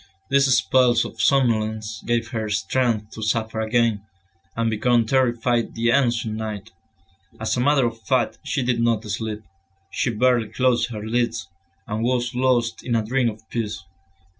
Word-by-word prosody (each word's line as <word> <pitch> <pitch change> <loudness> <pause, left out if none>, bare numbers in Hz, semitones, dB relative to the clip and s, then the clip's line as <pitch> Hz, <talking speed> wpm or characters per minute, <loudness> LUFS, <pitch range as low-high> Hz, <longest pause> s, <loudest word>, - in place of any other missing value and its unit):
These 140 0 +4
spells 125 -2 +3
of - - -6
somnolence 110 -5 +1
gave 115 -1 -1
her 110 -4 -3
strength 110 +1 0
to 110 - -9
suffer 110 0 -1
again, 115 -1 +1 0.5
and 115 0 0
become 115 +1 +2
terrified 120 -1 +1
the 115 +1 +1
ensuing 120 -4 +1
night. 110 0 -5 0.7
As 110 - -1
a - - -2
matter 140 0 +3
of 115 -1 -4
fact 130 +1 0
she 140 -2 -1
did 120 -1 0
not 115 -2 +1
sleep, 105 0 -4 0.5
she 135 - 0
barely 120 0 +2
closed 125 +1 +1
her 105 -2 -6
lids, 115 -4 -1 0.4
and 105 +1 -3
was 120 0 0
lost 125 -2 +1
in 120 - -1
a 110 -1 0
dream 125 +1 +1
of 110 0 -11
peace. 105 -4 -3
115 Hz, 160 wpm, -23 LUFS, 110-125 Hz, 0.7 s, These